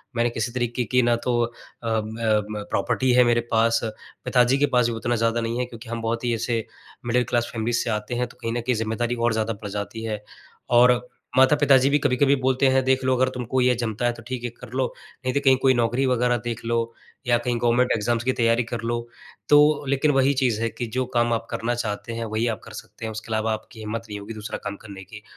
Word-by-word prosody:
मैंने 120 0 +2
किसी 115 0 -3
तरीके 120 0 -1
की 125 - +5
ना 120 -1 +3
तो 120 -1 +1
अ - - 0
अ, - - -15 0.4
प्रॉपर्टी 110 +1 0
है 125 0 +6
मेरे 120 -1 +3
पास, 115 +1 +3 0.5
पिताजी 125 +1 +3
के 145 - +3
पास 125 -1 +4
भी 115 - -2
उतना 120 +2 -1
ज़्यादा 115 +1 +1
नहीं 115 +1 -2
है 125 - 0
क्योंकि 115 -1 -11
हम 115 0 -3
बहुत 115 +1 -2
ही 120 -1 +1
ऐसे, 115 0 -2 0.4
मिडल 125 +1 +2
क्लास 120 0 0
फैमिलीज़ 115 +1 -1
से - - -3
आते 105 +2 -2
हैं। 125 +1 -1
तो - - -18
कहीं 115 - -2
ना 120 - -1
कहीं 125 +1 0
ज़िम्मेदारी 115 +2 -1
और 120 -1 +1
ज़्यादा 110 0 -1
बढ़ 105 0 -8
जाती 105 +3 -5
है 105 -2 -4 0.6
और 125 0 +7 0.4
माता-पिता 145 +1 +5
जी 130 +1 +3
भी 145 - +4
कभी-कभी 140 0 +3
बोलते 130 +1 +3
हैं 130 0 +3
देख 130 0 +2
लो 130 0 +2
अगर 130 +1 +2
तुमको 125 0 -2
ये 125 0 +4
जमता 120 0 -2
है 120 - +3
तो 115 - -12
ठीक 125 -1 -4
है 120 - -2
कर 120 -1 -13
लो, 130 0 +1 0.4
नहीं 130 - 0
तो 140 - +2
कहीं 130 -1 +7
कोई 130 -1 +5
नौकरी 120 +2 +1
वगैरह 125 -1 +2
देख 115 -2 -4
लो। 115 0 +1 0.5
या 120 - +4
कहीं 120 0 -1
गवर्नमेंट 120 +1 +3
एग्ज़ाम्स 115 +1 0
की 130 - +2
तैयारी 115 0 +2
कर 115 0 -5
लो। 120 +1 -1 0.5
तो 150 0 +5
लेकिन 140 +2 +2
वही 135 0 +3
चीज़ 125 -5 +1
है 115 - +1
कि 120 - -5
जो 130 - +1
काम 120 0 +3
आप 115 - -2
करना 120 +2 -1
चाहते 110 0 -4
हैं 115 0 -3
वही 110 +2 -1
आप 110 -3 -2
कर - - -12
सकते 115 - -9
हैं 110 - -3
उसके 110 +1 -8
अलावा 110 0 +1
आपकी 110 +1 -8
हिम्मत 110 +1 -4
नहीं 105 -1 -5
होगी 105 +3 -8
दूसरा 110 0 -5
काम 100 - -3
करने 100 -3 -9
की। 105 +2 -12
120 Hz, 245 wpm, -24 LUFS, 115-125 Hz, 0.6 s, और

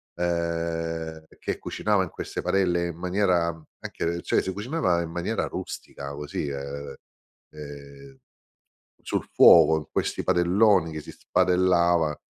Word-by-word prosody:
ehm, 85 -2 -2
che - - -4
cucinava 105 -2 0
in 85 - -5
queste - - -5
barelle 90 -3 +1
in 85 - -7
maniera 90 -1 +1 0.4
anche 85 +1 -3
cioè - - +2
si 95 - -3
cucinava 105 - 0
in 85 -1 -5
maniera 90 +6 -2
rustica 70 0 -7
così, 75 0 -4
ehm, 70 0 -6 0.6
ehm, 70 -2 -11 0.9
sul - - -2
fuoco 80 - +7
in 75 - -4
questi - - -1
padelloni 90 0 +3
che 80 - -5
si - - -10
spadellava. 85 -4 +2
85 Hz, 125 wpm, -25 LUFS, 75-90 Hz, 0.9 s, fuoco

